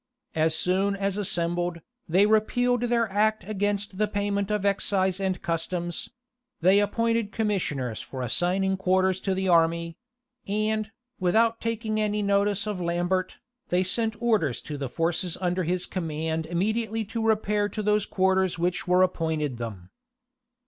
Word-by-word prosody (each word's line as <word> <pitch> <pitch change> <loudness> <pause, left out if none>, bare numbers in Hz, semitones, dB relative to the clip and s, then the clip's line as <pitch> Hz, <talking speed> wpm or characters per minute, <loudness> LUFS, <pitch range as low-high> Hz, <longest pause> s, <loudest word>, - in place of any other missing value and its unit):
As 160 0 +2
soon 195 +4 +1
as 195 0 -1
assembled, 175 -3 -1 0.3
they 185 +5 +5
repealed 240 +3 +2
their 235 -1 +1
act 215 +2 +2
against 205 -1 -2
the 215 - +3
payment 200 -1 -1
of 210 -1 -1
excise 190 -1 +1
and 190 -2 -1
customs; 170 +1 -2 0.5
they 185 +4 +5
appointed 230 +1 0
commissioners 170 - -1
for 130 -1 -6
assigning 185 - +1
quarters 185 0 +2
to 190 -1 0
the 190 0 -1
army; 170 -1 +2 0.5
and, 215 +1 0 0.3
without 225 +5 +2
taking 225 -1 -1
any 210 0 0
notice 200 +1 +1
of 205 -4 -3
Lambert, 175 +2 -1 0.3
they 180 +1 +2
sent 220 +3 -1
orders 215 - +1
to 150 - -6
the 140 -2 -4
forces 165 +3 -1
under 180 0 0
his 180 +2 -1
command 160 -2 -3
immediately 220 +5 -1
to 225 +3 -4
repair 210 -2 +1
to 215 - -4
those 210 0 +2
quarters 190 -1 +2
which 180 +2 -1
were 180 +1 +5
appointed 160 -7 -1
them. 100 -6 -7
190 Hz, 145 wpm, -26 LUFS, 175-210 Hz, 0.5 s, they